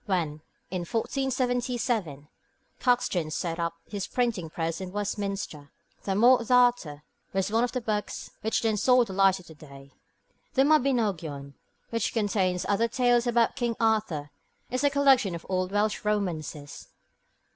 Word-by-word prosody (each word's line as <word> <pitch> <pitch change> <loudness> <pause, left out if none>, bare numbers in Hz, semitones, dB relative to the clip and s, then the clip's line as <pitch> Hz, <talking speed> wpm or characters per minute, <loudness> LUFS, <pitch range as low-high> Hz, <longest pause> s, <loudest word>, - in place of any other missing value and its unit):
When, 160 -6 -1 0.3
in 185 - -2
1477, 245 - -1 0.5
Caxton 240 -10 +1
set 165 +1 -3
up 170 0 -2
his 200 -2 -4
printing 230 -10 -1
press 165 +2 -3
at 190 - -4
Westminster, 195 -6 -4 0.4
the 195 - 0
Morte 240 +3 +5
D'Arthur 245 -12 +3 0.3
was 195 +1 0
one 225 +2 +2
of 245 - 0
the 255 - -3
books 215 -2 -3
which 220 +2 0
then 220 -2 +1
saw 250 +3 +5
the 195 - -8
light 195 0 +4
of 160 -3 -14
day. 140 -2 -13 0.6
The 270 - +5
Mabinogion, 205 - +1 0.4
which 230 0 -1
contains 195 -5 0
other 215 +3 +2
tales 245 0 +2
about 235 -1 +2
King 240 -4 -1
Arthur, 210 -10 0 0.4
is 255 +2 -1
a 285 - +5
collection 270 -9 +3
of 170 - -9
old 185 0 -1
Welsh 205 +1 0
romances. 165 -9 -3
205 Hz, 145 wpm, -27 LUFS, 170-245 Hz, 0.6 s, Morte